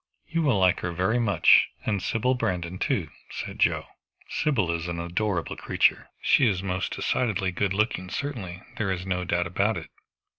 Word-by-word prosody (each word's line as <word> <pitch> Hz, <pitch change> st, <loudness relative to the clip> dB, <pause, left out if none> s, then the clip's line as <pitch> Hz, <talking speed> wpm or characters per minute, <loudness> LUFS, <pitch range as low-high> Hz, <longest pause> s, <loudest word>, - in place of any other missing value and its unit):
"You 165 Hz, 0 st, 0 dB
will 140 Hz, -9 st, +3 dB
like 95 Hz, -2 st, +3 dB
her 90 Hz, -, -3 dB
very 95 Hz, +8 st, +1 dB
much, 115 Hz, -4 st, +5 dB, 0.2 s
and 100 Hz, -3 st, 0 dB
Sybil 115 Hz, +6 st, +1 dB
Brandon 90 Hz, -7 st, -2 dB
too," 95 Hz, -, -1 dB, 0.2 s
said -, -, -6 dB
Joe. -, -, +2 dB, 0.4 s
"Sybil 110 Hz, -, +1 dB
is 85 Hz, 0 st, -2 dB
an 85 Hz, -1 st, -3 dB
adorable 85 Hz, -1 st, -1 dB
creature." -, -, +1 dB
"She 135 Hz, -, +5 dB
is 95 Hz, -3 st, 0 dB
most 95 Hz, -1 st, -2 dB
decidedly 105 Hz, -6 st, 0 dB
good 95 Hz, +2 st, 0 dB
looking, 100 Hz, -4 st, 0 dB
certainly. 100 Hz, -11 st, -5 dB
There 100 Hz, -3 st, 0 dB
is 90 Hz, -1 st, -3 dB
no 90 Hz, -1 st, -1 dB
doubt 85 Hz, 0 st, +1 dB
about 100 Hz, +6 st, 0 dB
it." -, -, -8 dB
95 Hz, 175 wpm, -26 LUFS, 90-110 Hz, 0.4 s, much